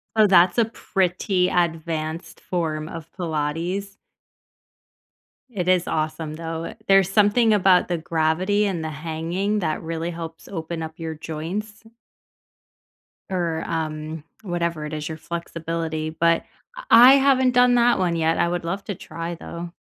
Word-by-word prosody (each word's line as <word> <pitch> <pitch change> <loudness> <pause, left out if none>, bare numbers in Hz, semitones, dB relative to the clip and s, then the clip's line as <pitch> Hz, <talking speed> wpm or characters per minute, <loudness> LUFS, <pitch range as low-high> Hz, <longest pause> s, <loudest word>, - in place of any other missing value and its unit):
Oh, 215 -1 +6
that's 185 +2 +5
a 230 - +5
pretty 185 -3 0
advanced 165 -1 -2
form 160 -3 -3
of 165 -1 -9
pilates. 170 +4 -3 1.5
It 185 -6 -3
is 185 -1 +3
awesome, 155 0 -2
though, 165 0 -5
it 220 - -9
There's 195 -1 +5
something 215 +2 +4
about 190 -3 +4
the 175 -2 -1
gravity 165 +6 +1
and 180 -5 -2
the 160 - -3
hanging 165 +7 -2
that 155 -4 -2
really 165 +1 -3
helps 165 -1 -8
open 165 -2 -5
up 160 0 -7
your 160 -1 -5
joints 175 +8 -5 1.5
or, 170 -4 -1
um, 155 -1 -4 0.2
whatever 170 -4 -2
it 150 - -6
is, 150 0 -4
your 160 - -5
flexibility. 165 -1 -4
But, 165 +1 +2 0.3
uh, - - -7
I 245 +3 +10
haven't 265 -2 +4
done 245 0 +5
that 240 -3 +4
one 175 -2 +1
yet. 165 0 +1
I 170 - +2
would 175 -1 -2
love 195 +4 -3
to 200 - -4
try, 165 +2 -6
though. 170 +1 -8
170 Hz, 150 wpm, -23 LUFS, 160-195 Hz, 1.5 s, I